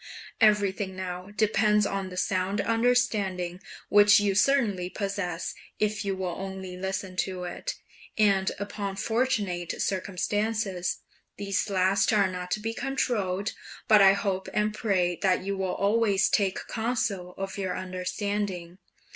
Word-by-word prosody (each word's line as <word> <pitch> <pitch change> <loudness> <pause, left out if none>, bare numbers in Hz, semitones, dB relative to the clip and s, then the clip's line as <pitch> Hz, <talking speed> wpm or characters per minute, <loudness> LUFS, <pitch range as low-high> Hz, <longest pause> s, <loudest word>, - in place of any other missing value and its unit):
Everything 205 -3 +2
now 185 0 -5
depends 210 -1 +3
on 195 -2 -2
the 180 - -9
sound 185 +2 0
understanding 210 -6 +1 0.3
which 205 +1 +7
you 205 -1 +1
certainly 205 -5 +2
possess 195 -4 -3 0.3
if 210 0 0
you 195 -1 -1
will 185 -2 -3
only 190 -1 -6
listen 190 0 -4
to 185 -1 -2
it, 175 - -4 0.4
and 200 -3 +3
upon 200 -1 -4
fortunate 205 -5 -1
circumstances; 200 0 -1 0.4
these 200 +1 -1
last 190 0 +2
are 205 -3 +4
not 180 0 -5
to 215 - 0
be 225 +2 -3
controlled, 210 -7 -1 0.3
but 210 -2 +7
I 195 0 +8
hope 195 -1 -2
and 210 0 +1
pray 185 -5 0
that 185 -2 +2
you 200 +1 -2
will 190 -1 -2
always 205 -1 +2
take 195 -3 +1
counsel 220 -6 -2
of 195 +1 -5
your 190 -2 -2
understanding. 185 -1 -3
195 Hz, 135 wpm, -27 LUFS, 185-210 Hz, 0.4 s, I